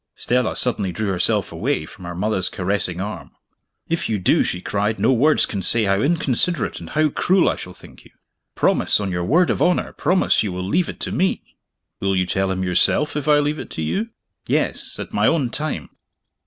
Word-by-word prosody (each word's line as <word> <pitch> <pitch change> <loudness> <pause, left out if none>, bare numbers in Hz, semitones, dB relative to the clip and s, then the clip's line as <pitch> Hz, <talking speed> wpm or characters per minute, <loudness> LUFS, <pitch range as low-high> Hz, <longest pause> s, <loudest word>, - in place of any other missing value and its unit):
Stella 125 -1 0
suddenly 105 -7 +1
drew 110 +3 -3
herself 90 - 0
away 80 - -2
from 90 +3 -12
her 85 0 -6
mother's 95 0 0
caressing 90 -2 -1
arm. 105 +3 -5 0.6
"If 165 -6 -2
you 110 - 0
do," 90 - +2
she 90 - -1
cried, 105 +3 -2
"no 115 +6 +3
words 145 +6 +4
can 100 - -4
say 115 +4 +3
how 100 0 +1
inconsiderate 165 +2 0
and - - -10
how 155 0 +2
cruel 185 +5 +2
I - - +1
shall - - -9
think - - -14
you. - - -16 0.5
Promise - - +2
on 100 -2 -3
your 90 -1 -2
word 165 - +3
of - - -2
honor 180 0 +1
promise 180 +5 +2
you 105 - -2
will 90 +1 -4
leave 175 - +1
it - - -8
to - - -2
me!" 190 +1 -1 0.4
"Will 95 0 0
you 90 -1 +1
tell 95 +1 -1
him, 95 0 -2
yourself 95 - +2
if 150 -1 -3
I 150 -1 +5
leave 145 +1 0
it - - -7
to 80 - -5
you?" 210 - -2 0.4
"Yes - - -1
at - - -7
my - - +2
own 140 -8 +1
time. 140 - -3
110 Hz, 210 wpm, -21 LUFS, 95-150 Hz, 0.6 s, I